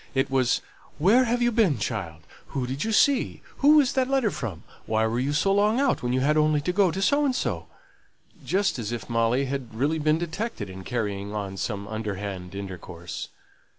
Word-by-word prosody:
It 135 +1 +1
was, 130 -2 +2 0.4
"Where 210 - +5
have 240 +1 +1
you 240 - +3
been, 215 - +3
child?" 95 -8 -4 0.2
"Who 135 -3 -3
did 130 +3 -3
you 225 - -1
see?" 275 +5 +2
"Who 295 +2 +6
was 280 -4 +4
that 260 -1 +1
letter 265 -6 +2
from?" 100 -10 -5 0.2
"Why 110 0 +2
were 115 +2 0
you 135 +3 0
so 180 +7 +2
long 210 +4 +3
out 275 -2 +2
when 125 - -1
you 130 +1 +1
had 150 +3 +2
only 155 -1 +3
to 180 +5 -1
go 195 -1 +4
to 190 +4 -2
so 285 +9 +3
and 270 -3 +1
so?" - - -2 0.8
just 195 -7 0
as 110 -1 -3
if 120 0 -5
Molly 115 +4 +2
had 130 -4 -5
really 145 +7 0
been 155 +1 +2
detected 170 - -4
in 95 0 -9
carrying 105 -3 -3
on 100 -2 -4
some 100 0 -3
underhand 100 -4 -5
intercourse. 90 -3 -7
135 Hz, 200 wpm, -26 LUFS, -, 0.8 s, Who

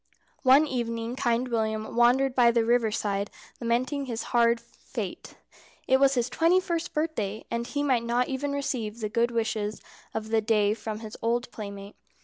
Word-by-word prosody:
One 270 +3 +6
evening 235 -3 -3
Kind 240 0 +1
William 220 -2 -1
wandered 250 +3 +4
by 245 -2 +5
the 235 -1 +2
river 235 -1 +3
side 200 -1 -1 0.3
lamenting 255 +4 0
his 230 -2 -3
hard 235 -1 +4
fate. 235 0 -8 0.5
It 265 - +4
was 275 0 +4
his 240 -1 +1
twenty 335 +7 +3
first 340 -2 -3
birthday, 265 -10 -2
and 235 0 -2
he 285 +2 -2
might 255 -5 +2
not 240 +1 +1
even 280 +1 -2
receive 240 -6 -3
the 215 -2 -2
good 235 +2 +2
wishes 220 -2 -2 0.4
of 220 0 -3
the 225 0 +2
day 210 -1 +2
from 220 -1 -6
his 220 -1 -8
old 240 +2 0
playmate. 200 -1 -8
235 Hz, 170 wpm, -27 LUFS, 220-260 Hz, 0.5 s, One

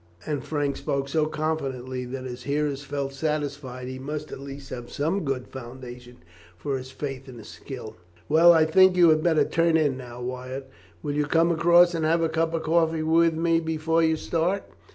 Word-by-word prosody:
And 145 -4 -2
Frank 145 -3 -1
spoke 140 0 -2
so 155 +1 +1
confidently 135 -5 -3
that 130 +1 -6
his 125 -1 -7
hearers 145 -1 -1
felt 140 -1 -4
satisfied 140 -4 -3
he 130 0 -6
must 150 +3 -5
at - - -7
least 140 0 -9
have 120 -1 -6
some 165 +7 -1
good 135 -3 -2
foundation 125 -2 -10 0.3
for 140 +7 -3
his 130 0 -6
faith 135 0 -6
in 125 - -10
his 110 - -11
skill. 110 -5 -9 0.3
"Well, 165 +3 +7
I 160 -2 +5
think 185 +3 +5
you 175 -2 +7
had 155 0 +4
better 160 -2 +3
turn 165 -1 +2
in 145 -4 +1
now, 120 -2 -9
Wyatt. 130 +2 -6 0.3
Will 145 -2 -2
you 150 0 +1
come 165 +3 +3
across 170 +1 +5
and 165 -1 -1
have 165 +2 +2
a 165 - +1
cup 165 +1 0
of 160 - -2
coffee 160 -1 +2
with 165 +1 +3
me 165 0 +2
before 160 0 0
you 160 -1 +3
start?" 170 +5 -1
150 Hz, 195 wpm, -25 LUFS, 130-160 Hz, 0.3 s, Well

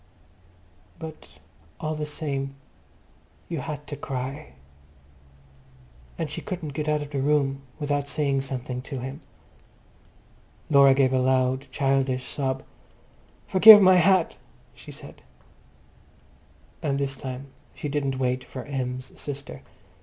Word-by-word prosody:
But 160 - -10 0.4
all 155 0 -2
the 150 -1 -3
same 140 -2 -3 0.9
you 165 -3 -3
had 150 +2 -6
to 145 - -6
cry, 130 - -5 1.6
and 165 - -2
she 150 - -6
couldn't 170 -6 -5
go 150 - -3
out 150 -1 0
of 145 - -10
the 140 -2 -1
room 140 -1 +1 0.2
without 145 -1 -1
saying 140 -2 0
something 125 -2 -5
to 135 +1 -6
him. 130 +4 -6 1.5
Laura 140 -2 +7
gave 130 -1 +3
a 130 - +3
loud 130 +1 +1
childish 135 -2 0
sob. 135 -2 -2 0.8
"Forgive 210 +3 +10
my 185 -2 +6
hat," 180 0 +3 0.4
she - - -12
said. - - -12 1.6
And 140 -2 0
this 140 -1 -1
time 130 +1 -7 0.3
she - - -5
didn't 140 -2 -1
wait 125 -1 0
for 130 - -8
Em's 130 -2 -4
sister. 140 -2 -6
140 Hz, 125 wpm, -25 LUFS, 130-150 Hz, 1.6 s, Forgive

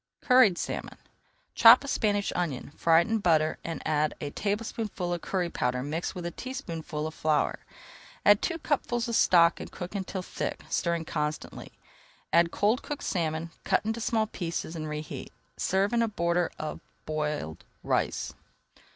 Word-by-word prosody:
CURRIED 250 -9 +5
SALMON - - -4 0.6
Chop 235 +3 +8
a - - -7
Spanish 205 -6 0
onion, 150 -6 -2
fry 165 0 +5
it - - -3
in 225 0 +1
butter, 160 -5 +2
and 165 -1 -5
add 155 -1 +1
a 145 - -4
tablespoonful 205 -3 -2
of 175 - -3
curry 185 -3 -1
powder 125 -5 -1
mixed 160 +6 -3
with 180 -1 -5
a 175 - -2
teaspoonful 165 - -5
of 155 - -4
flour. 155 -2 +1 0.7
Add 205 0 +6
two 335 - -1
cupfuls 255 -6 -1
of 235 - -1
stock 170 -4 +5
and - - -8
cook 180 +1 -7
until 190 -2 -4
thick, - - -4
stirring 170 -1 0
constantly. 150 -1 -4 0.6
Add 170 0 +5
cold 215 +8 +1
cooked 295 - -6
salmon, 165 -2 -2
cut - - +1
into 225 +1 -2
small 220 -1 +1
pieces, 170 -5 -4
and 155 -1 -4
reheat. 150 0 -6 0.2
Serve 195 +4 +1
in 235 - +3
a 230 - +2
border 170 -4 0
of 155 - -5 0.3
boiled 150 - -3 0.2
rice. - - -1
175 Hz, 160 wpm, -28 LUFS, 155-215 Hz, 0.7 s, Chop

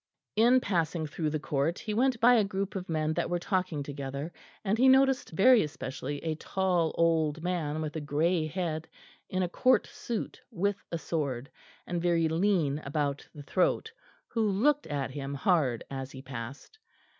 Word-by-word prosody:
In 240 +4 +6
passing 165 -5 0
through 155 +1 -2
the 155 - -1
court 145 +3 0
he 215 - -4
went 250 +2 +2
by 240 +2 +7
a 225 -3 +5
group 195 0 -3
of 185 -2 -5
men 155 -1 0
that - - -1
were 175 - +1
talking 180 -4 -1
together, 140 +3 -5 0.3
and 200 +2 +2
he 260 - +6
noticed 265 0 +4
very 225 +8 +6
especially 145 -2 -4
a 160 -1 0
tall 175 0 0
old 160 -2 +2
man 160 -4 -1
with 155 0 -4
a 160 - -2
grey 155 +3 +1
head, 160 -2 -3 0.4
in 185 0 0
a - - +1
Court 255 +8 +3
suit 235 -3 -5
with 200 -2 -1
a 170 - -1
sword, 140 -5 -3 0.3
and 175 -1 -2
very 170 -2 +2
lean 160 -4 +1
about 145 -1 -2
the 145 - -8
throat, 185 - +1 0.4
who 225 -2 0
looked 280 +10 +2
at 140 -3 -2
him 140 0 -5
hard 140 -6 +1
as 135 -1 -4
he 130 0 -10
passed. 130 - -8
165 Hz, 175 wpm, -29 LUFS, 145-195 Hz, 0.4 s, by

